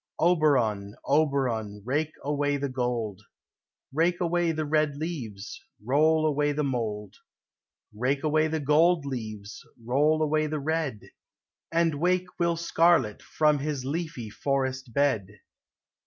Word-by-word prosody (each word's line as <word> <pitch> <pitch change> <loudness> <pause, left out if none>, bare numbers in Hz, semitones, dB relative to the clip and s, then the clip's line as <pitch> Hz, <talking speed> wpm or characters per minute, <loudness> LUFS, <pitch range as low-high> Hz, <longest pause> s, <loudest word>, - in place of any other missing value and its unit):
Oberon, 125 - +2
Oberon, 130 -9 0
rake 150 +5 -1
away 145 0 0
the 140 0 -2
gold, 120 -6 -2 0.7
Rake 170 +4 +2
away 175 -1 +1
the 155 -1 -2
red 150 -1 +1
leaves, 130 - -6 0.2
roll 155 +7 +2
away 145 -1 +1
the 150 +1 -1
mold, 110 -7 -3 0.8
Rake 130 +7 -1
away 155 0 +2
the 160 0 -2
gold 155 +2 +3
leaves, 110 -6 -6 0.2
roll 145 +7 +2
away 155 0 +1
the 155 0 -3
red, 150 -6 -2 0.7
And 165 -3 +1
wake 180 +1 +2
Will 170 -1 +1
Scarlett 165 -9 +2
from 150 -2 +1
his 140 -2 -3
leafy 145 -6 -4
forest 130 0 -2
bed. 135 -7 +1
145 Hz, 125 wpm, -27 LUFS, 125-155 Hz, 0.8 s, gold